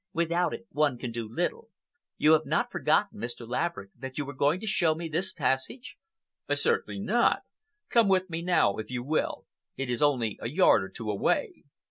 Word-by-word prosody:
Without 170 0 +1
it - - -7
one 145 -5 +1
can 120 0 -5
do 115 -1 -5
little. 175 - -2 0.5
You 155 +1 +5
have 155 0 +3
not - - 0
forgotten, - - +1
Mr. 120 0 -6
Laverick, 125 -5 -2
that 130 -1 -8
you 145 - -1
were 140 - -7
going 145 +5 +2
to - - -5
show 170 -6 +2
me 165 +1 -5
this 175 +4 -1
passage?" 135 - -2 0.6
"Certainly - - 0
not. - - +2 0.5
Come 230 -3 +4
with 185 -1 +3
me 165 -2 -4
now, 175 - +2
if 110 -1 -6
you 125 -1 -3
will. 155 +4 -1 0.3
It 135 -2 -2
is 120 - -2
only 125 -7 +1
a 115 - -3
yard 150 - +4
or 95 - -7
two 105 +2 -4
away." 100 - -1
145 Hz, 190 wpm, -28 LUFS, 120-170 Hz, 0.6 s, You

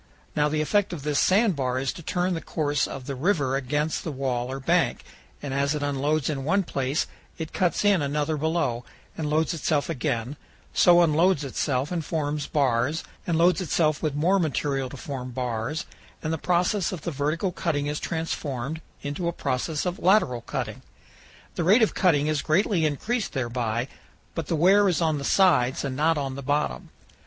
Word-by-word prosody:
Now 150 0 +2
the 155 0 0
effect 205 +4 +1
of 150 -5 -6
this 145 -1 +1
sand 195 +4 +3
bar 130 -2 -1
is 130 0 -1
to - - -9
turn 180 +3 -1
the 165 - -3
course 145 -3 0
of 135 -2 -7
the 140 - -4
river 140 -2 +1
against 145 +4 -1
the 160 - -3
wall 130 -2 -2
or 135 - -4
bank, 135 - +1 0.4
and 140 -2 -3
as 140 +2 +1
it 150 - -3
unloads 145 +1 0
in 140 -3 -2
one 195 +7 +2
place 135 -2 -1 0.3
it 160 -2 -6
cuts 180 +2 +1
in 200 -5 +4
another 145 +2 0
below 155 -6 -1 0.3
and 155 -2 -3
loads 155 +1 +1
itself 155 -2 0
again; 120 +2 -2 0.4
so 175 -1 +6
it - - +7
unloads 165 0 +3
itself 135 +1 -1
and 170 -3 -1
forms 150 -1 -2
bars, 135 +1 +1 0.2
and 170 -2 +1
loads 175 +1 +4
itself 155 -3 +1
with 155 -3 -1
more 180 +7 +3
material 140 -4 -1
to 140 - -9
form 130 -2 -5
bars, 125 +3 -3 0.4
and 155 0 -1
the 160 - -2
process 180 +3 +1
of 180 - -5
vertical 160 +4 -1
cutting 150 -5 -1
is 150 +1 -2
transformed 155 -3 -3 0.2
into 145 +5 -3
a - - +1
process 145 +2 -2
of 180 +3 -2
lateral 175 - +3
cutting. - - -4 0.7
The 175 - -2
rate 210 +8 +5
of 220 - +2
cutting 150 -6 +3
is 155 -1 0
greatly 170 0 +2
increased 215 - -2
thereby, 120 -2 -1 0.5
but 165 -4 -4
the 165 - 0
wear 195 +5 +5
is 175 - +1
on 160 -3 +1
the - - -5
sides 140 -7 +3
and 135 -2 -3
not 155 +3 +2
on 135 -2 -2
the 140 - -6
bottom. 130 - -1
150 Hz, 190 wpm, -25 LUFS, 135-170 Hz, 0.7 s, it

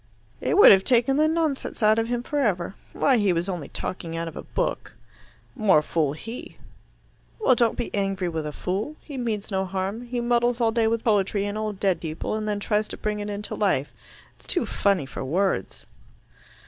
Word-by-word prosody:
"It - - +1
would 410 - +10
have 190 -1 +6
taken 250 +4 +3
the 310 +1 +4
nonsense 315 -7 -1
out 215 +1 +5
of 225 - 0
him 240 0 -2
for 295 +3 -2
ever. 190 -8 0 0.2
Why, 270 -3 +3
he 205 -4 +3
was 170 +1 -1
only 175 -7 -4
talking 165 -3 -5
out 165 0 -3
of 165 - -8
a - - -5
book." - - -3 0.6
"More 190 -8 +4
fool 150 -3 0
he." 225 +10 -8 0.8
"Well, 350 -12 +4
don't 235 -2 +2
be 240 - -4
angry 195 -2 -1
with 160 -3 -3
a - - -4
fool. 195 - -3
He 290 - -9
means 225 -5 -3
no 190 0 +1
harm. 195 +5 -3
He 245 0 -2
muddles 240 0 +1
all 230 -2 +3
day 225 0 +2
with 230 0 0
poetry 205 -2 +1
and 205 0 -3
old 215 -2 -3
dead 190 -5 +1
people, 160 +3 -4
and 215 0 -2
then 205 -1 -1
tries 210 +1 0
to - - -6
bring 210 -1 -2
it 205 0 -4
into 205 0 -4
life. 185 -10 0 0.4
It's - - -21
too 350 - +1
funny 200 -7 +1
for 135 - -6
words." 170 - -1
210 Hz, 205 wpm, -25 LUFS, 185-235 Hz, 0.8 s, would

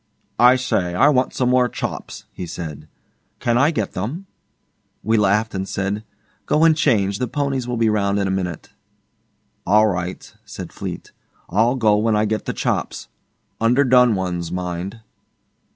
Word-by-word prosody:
'I 125 +1 +7
say, 90 -9 -1
I 140 +11 +5
want 130 -3 +2
some 125 -1 +1
more 125 -1 +3
chops,' - - -6
he 90 - -6
said. 75 -3 -7 0.5
'Can 120 - 0
I 140 +5 +4
get 110 - -2
them?' 130 - -4 0.8
We 110 +2 +1
laughed 105 +1 +2
and 95 0 -3
said, 100 +2 -2 0.4
'Go 155 - +3
and 165 -1 +6
change. 100 -10 +1
The 125 - -1
ponies 135 -1 -2
will 125 -1 -2
be 115 -1 +2
round 100 -2 +1
in 100 -1 0
a - - -1
minute.' 90 -3 -3 0.9
'All 105 +4 +4
right,' 90 -3 -3
said - - -8
Fleete. - - -7 0.4
I'll 115 +7 +3
go 110 -5 +3
when 110 +1 +1
I 105 +1 +2
get 110 0 -2
the - - -1
chops - - -2 0.5
underdone 125 -1 +4
ones, 90 -3 -3
mind. 90 +4 -4
110 Hz, 160 wpm, -21 LUFS, 95-125 Hz, 0.9 s, I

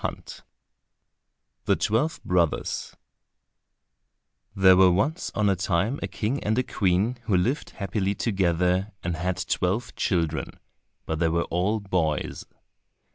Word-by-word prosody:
9 - - -3 1.4
The - - +3
Twelve 135 +9 0
Brothers 85 -3 0 1.6
There 95 -1 +7
were 95 0 +6
once 120 - 0
on 105 -2 +2
a 100 - +3
time 95 +8 0
a - - -2
king 120 +6 -2
and 110 +2 0
a 130 - +2
queen 100 +4 0
who 105 -5 +2
lived 125 - 0
happily 100 0 -1
together 90 -1 0
and 85 -1 -2
had 90 +3 -2
twelve 100 +7 -1
children, 80 -4 -1 0.5
but 80 -1 -3
they 85 -1 +2
were 85 +1 0
all 95 +6 +1
boys. 90 -7 -2
95 Hz, 130 wpm, -25 LUFS, 90-110 Hz, 1.6 s, There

